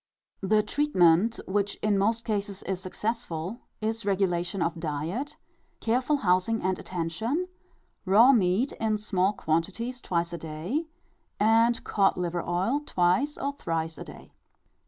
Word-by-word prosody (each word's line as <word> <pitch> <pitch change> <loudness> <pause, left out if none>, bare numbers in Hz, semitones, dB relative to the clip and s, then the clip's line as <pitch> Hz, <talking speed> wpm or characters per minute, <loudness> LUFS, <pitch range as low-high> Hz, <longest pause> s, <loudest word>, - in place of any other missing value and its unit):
The 210 +2 +3
treatment, 215 - +3
which 200 +1 0
in 210 -1 +3
most 220 +4 +1
cases 205 -3 -3
is 190 -1 -3
successful, 200 -1 -3 0.2
is 220 +1 -2
regulation 185 -2 0
of 165 0 -2
diet, 165 - -3 0.4
careful 250 +6 +1
housing 185 +5 +2
and 185 0 0
attention, 200 - -2 0.6
raw 215 +7 +6
meat 215 +2 +2
in 220 -1 +1
small 195 -2 +1
quantities 200 +9 -2
twice 170 -1 -1
a 170 - -4
day, 165 - -3 0.5
and 230 +2 +4
cod 195 -2 +2
liver 175 -1 -1
oil 185 +12 0
twice 190 +6 +1
or 280 - -2
thrice 165 - -3
a - - -5
day. - - -13
200 Hz, 135 wpm, -27 LUFS, 175-230 Hz, 0.6 s, raw